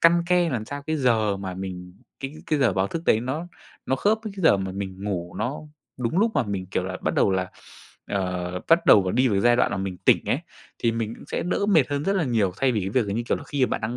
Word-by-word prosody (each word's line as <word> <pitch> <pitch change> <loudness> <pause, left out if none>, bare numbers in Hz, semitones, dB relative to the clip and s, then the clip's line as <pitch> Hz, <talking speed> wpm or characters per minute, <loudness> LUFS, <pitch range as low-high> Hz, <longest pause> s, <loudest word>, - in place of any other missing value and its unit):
căn 170 +1 +5
ke 180 -1 +3
làm 120 -6 -2
sao 140 +5 -6
cái 155 - 0
giờ 110 -7 +2
mà 95 -2 -5
mình 90 -1 -7 0.3
cái 135 +2 -5
cái 155 - +1
giờ 125 -7 +3
báo 95 +1 +1
thức 165 - -4
đấy 110 - +4
nó 150 +8 -4 0.4
nó 130 - +1
khớp 210 +9 +2
với 215 - -5
cái 190 - -5
giờ 130 - +6
mà 95 -1 -4
mình 95 0 -6
ngủ 90 -4 -3
nó 125 +7 -2 0.4
đúng 125 +9 -1
lúc 225 +2 +3
mà - - +3
mình, 100 -4 -4
kiểu 95 - -2
là, 95 0 -4
bắt 80 - 0
đầu 100 - +3
là 95 -1 -1 0.6
ờ, 90 -2 -2
bắt 165 +1 +4
đầu 95 -3 +6
đi 130 +6 +3
vào 100 -4 +1
giai 120 +2 +4
đoạn - - +2
mà - - -2
mình 95 -1 -3
tỉnh - - +4
ấy, - - +1 0.4
thì 115 -1 +1
mình 115 -1 -3
cũng - - -13
sẽ - - -2
đỡ 185 +3 0
mệt 165 -10 +4
hơn 145 +1 -2
rất 195 - +2
là 170 - +1
nhiều. 110 -7 +1
Thay 135 -2 +3
vì 110 - 0
cái 95 - -2
việc 115 -1 +1
là, 100 - -2
như 115 - -1
kiểu - - +2
là, - - -9
khi 140 -3 +1
mà - - -7
bạn - - -1
đang 110 +3 -3
115 Hz, 285 wpm, -24 LUFS, 95-145 Hz, 0.6 s, giờ